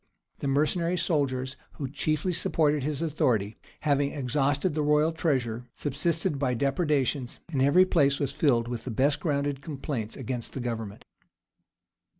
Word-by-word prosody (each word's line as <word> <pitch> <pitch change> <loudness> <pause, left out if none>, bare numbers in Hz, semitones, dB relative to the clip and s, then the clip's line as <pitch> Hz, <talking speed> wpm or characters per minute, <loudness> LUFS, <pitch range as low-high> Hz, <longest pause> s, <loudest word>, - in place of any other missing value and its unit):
The - - -2
mercenary 165 +5 +1
soldiers, 140 -6 0 0.2
who 140 - -4
chiefly 155 +5 -1
supported 150 -3 +2
his 150 +3 -2
authority, 115 -9 0 0.2
having 145 -2 +1
exhausted 145 +4 0
the 155 - 0
royal 150 +2 +3
treasure, 125 -8 -1
subsisted 155 +2 -1
by 130 -3 +1
depredations; 140 -1 0
and 135 -4 0
every 150 +7 +6
place 140 -6 +3
was 140 -3 -1
filled 120 -6 +2
with 120 -2 -4
the - - -4
best 135 +5 +2
grounded 140 -3 -1
complaints 140 -6 -4
against 125 -2 -4
the - - -4
government. 115 -4 -5
140 Hz, 145 wpm, -28 LUFS, 130-155 Hz, 0.2 s, every